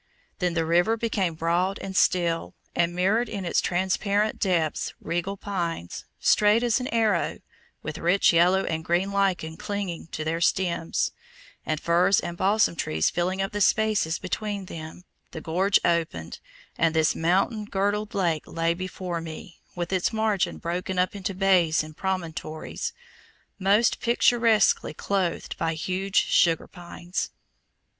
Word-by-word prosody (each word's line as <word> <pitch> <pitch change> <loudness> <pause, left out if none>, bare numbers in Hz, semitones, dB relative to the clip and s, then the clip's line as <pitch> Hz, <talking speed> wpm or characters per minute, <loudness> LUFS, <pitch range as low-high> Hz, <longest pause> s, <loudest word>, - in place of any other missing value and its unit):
Then 180 -3 0
the 165 -1 +1
river 175 +7 +3
became 200 -7 -1
broad 175 +4 0
and 190 -1 -7
still, 170 -3 +1 0.2
and 170 0 +1
mirrored 205 +7 +1
in 200 -4 -4
its 170 - +1
transparent 200 +4 0
depths 170 -6 0
regal 175 +4 -3
pines, 170 - -4
straight 210 +3 +4
as 240 +1 +2
an 250 - -3
arrow, 220 -8 +1 0.5
with - - -5
rich 175 +2 +3
yellow 180 +3 +4
and 160 0 -2
green 175 +4 0
lichen 185 -5 0
clinging 200 -6 -4
to 155 - -3
their 165 +2 -2
stems, 170 -2 0 0.6
and 155 -1 0
firs 175 +4 +3
and 170 - -5
balsam 200 0 +2
pines 80 - 0
filling 185 +2 -1
up 195 - -3
the 205 - -3
spaces 215 -6 +2
between 200 +1 -4
them, 160 0 -9 0.3
the - - -5
gorge 185 +6 +2
opened, 160 - -1 0.4
and 165 0 +2
this 160 -1 +3
mountain 195 +6 +1
girdled 205 +1 -1
lake 170 -6 0
lay 165 0 0
before 180 -1 -5
me, 165 +1 -9 0.2
with 175 +1 -3
its 185 +3 +1
margin 215 -5 0
broken 180 +2 -3
up 180 +2 +1
into 195 -1 -4
bays 180 -5 +3
and 155 0 -11
promontories, 165 -4 -4 0.7
most 200 +4 +3
picturesquely 235 -2 +3
clothed 190 -4 -2
by 165 0 0
huge 185 +4 0
sugar 165 -2 +3
pines. 175 0 -5
180 Hz, 145 wpm, -26 LUFS, 170-200 Hz, 0.7 s, straight